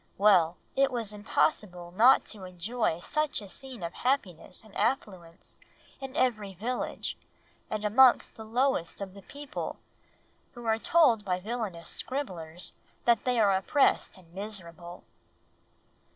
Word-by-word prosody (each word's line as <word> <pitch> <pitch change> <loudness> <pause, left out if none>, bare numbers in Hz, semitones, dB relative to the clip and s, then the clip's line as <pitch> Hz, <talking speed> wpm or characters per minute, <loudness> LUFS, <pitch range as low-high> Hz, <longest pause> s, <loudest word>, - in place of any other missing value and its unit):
Well! 180 -5 +5 0.2
It 275 0 +4
was 230 -4 -2
impossible 205 - 0
not 230 +8 +6
to 205 -3 -11
enjoy 185 0 -2
such 305 +8 0
a 205 - -9
scene 255 0 -8
of 170 - -4
happiness 200 - -1
and 215 -2 -17
affluence 185 -9 -3 0.4
in 270 0 -7
every 215 -9 0
village, 240 +7 -3 0.5
and 215 -1 -3
amongst 250 +4 +5
the 220 - -9
lowest 235 -5 0
of 195 -2 -6
the 200 - -12
people; 290 +7 -6 0.8
who 240 -1 -9
are 225 0 +2
told 255 -8 +4
by 180 -2 -1
villainous 205 -5 -4
scribblers 180 - -4 0.3
that 235 -3 +3
they 250 -2 +2
are 200 -3 +5
oppressed 210 +4 +2
and 170 -2 -19
miserable." 175 -4 -7
210 Hz, 135 wpm, -29 LUFS, 180-250 Hz, 0.8 s, not